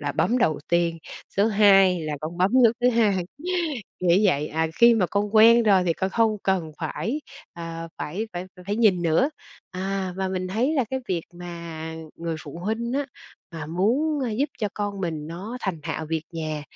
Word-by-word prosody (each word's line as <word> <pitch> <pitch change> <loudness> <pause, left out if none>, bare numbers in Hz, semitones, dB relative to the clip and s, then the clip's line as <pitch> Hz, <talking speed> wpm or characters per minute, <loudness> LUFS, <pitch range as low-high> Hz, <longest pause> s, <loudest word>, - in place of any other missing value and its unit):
là 145 -1 -2
bấm 245 - +1
đầu 155 - +2
tiên, 170 -1 +1 0.4
số 200 +2 +4
hai 210 -2 -2
2 190 -2 +5
là 155 -2 -3
con 160 +3 -5
bấm 185 +4 +2
nút 230 +1 +4
thứ 245 - +4
2, 205 -6 +2 0.8
nghĩa 180 +3 +4
vậy. 150 -1 -1
À, 160 +1 0
khi 235 0 +8
mà 195 -5 +2
con 205 +3 -2
quen 230 +2 +8
rồi 195 -4 +4
thì 170 - +3
con 190 +3 -2
không 220 -1 +2
cần 180 -5 0
phải, 175 - -3 0.3
ờ, 165 -1 -6
phải 200 +9 -3
phải 175 +1 -4 0.2
phải 205 +2 -1
nhìn 200 -6 +3
nữa." 170 - +2 0.4
À, 190 0 -3
và 190 0 -1
mình 185 -1 -3
thấy 245 +11 0
là 265 -4 +2
cái 265 - -1
việc 175 -3 -1
mà, 170 -2 -7 0.2
người 165 -1 -3
phụ 150 +2 -8
huynh 230 +3 -2
á 280 0 -1 0.5
mà 160 -2 -6
muốn, 250 - +1
ơ, 255 - -1
giúp 265 +8 0
cho 210 -4 0
con 205 -1 -3
mình 160 -4 -3
nó 195 +9 -6
thành 180 -6 -3
thạo 160 - -4
việc 160 -1 -2
nhà 155 -2 -4
185 Hz, 200 wpm, -24 LUFS, 165-220 Hz, 0.8 s, khi